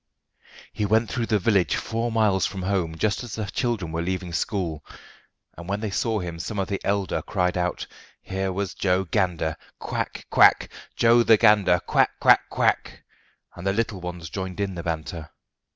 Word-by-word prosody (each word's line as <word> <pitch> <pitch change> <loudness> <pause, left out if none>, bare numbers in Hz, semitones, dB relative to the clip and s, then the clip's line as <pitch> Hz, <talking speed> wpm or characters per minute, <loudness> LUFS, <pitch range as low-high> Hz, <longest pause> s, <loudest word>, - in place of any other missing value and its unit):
He - - -2
went 110 +3 +2
through 120 -2 -2
the 110 - +2
village 95 -4 +2
four 115 +1 -2
miles 105 -5 +2
from 95 -2 -6
home 90 -4 -1
just 105 +5 0
as 120 -3 -7
the 110 - -3
children 100 -5 -2
were 80 +1 -2
leaving 90 0 -3
school, 85 -5 -2 0.7
and 85 +2 -10
when 100 +1 -1
they 105 -2 -3
saw 110 +3 0
him 85 -4 -5
some 105 +5 -5
of 95 -2 -1
the 100 - -2
elder 100 -1 0
cried 90 -3 -1
out 90 -1 -1
that - - -5 0.4
here 95 0 -2
was 95 0 -3
"Gander 90 -3 0
Joe! - - -25
quack! - - -4
quack! - - +5 0.3
Joe 120 +1 +5
the 115 -1 +5
Gander! 105 -5 +4
quack! - - +1
quack! - - +5
quack!" - - 0 0.5
and 90 +2 -6
the 95 - +2
little 110 -3 -2
ones 90 -2 -7
joined 95 -1 -5
in 100 -1 -1
the 85 - -5
banter. 80 -1 -5
95 Hz, 185 wpm, -24 LUFS, 90-105 Hz, 0.7 s, quack